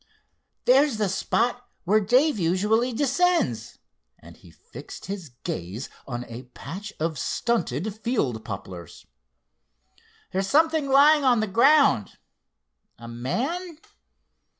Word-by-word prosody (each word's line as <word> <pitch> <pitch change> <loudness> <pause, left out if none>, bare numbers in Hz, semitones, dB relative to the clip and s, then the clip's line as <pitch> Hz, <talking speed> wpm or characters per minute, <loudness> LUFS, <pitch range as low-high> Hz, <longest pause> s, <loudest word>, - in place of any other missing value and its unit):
"There's 270 -1 +4
the 210 -1 +1
spot 245 +6 -1
where 210 +4 +3
Dave 250 +5 +2
usually 210 +8 +1
descends," 270 - 0 0.4
and - - -15
he - - -18
fixed - - -12
his 190 -5 -6
glance 95 +8 -5 0.2
on 125 -2 -5
a 120 +2 -9
patch 195 +9 -7
of 160 -2 -2
stunted 195 - -1
field 140 - -1
poplars. 95 -4 -9 1.3
"There's 190 +1 -1
something 315 +2 +2
lying 290 +2 +6
on 250 -3 +4
the 215 - +1
ground. 255 - +3 0.8
A 115 - -11
man? 270 - -3
215 Hz, 110 wpm, -25 LUFS, -, 1.3 s, lying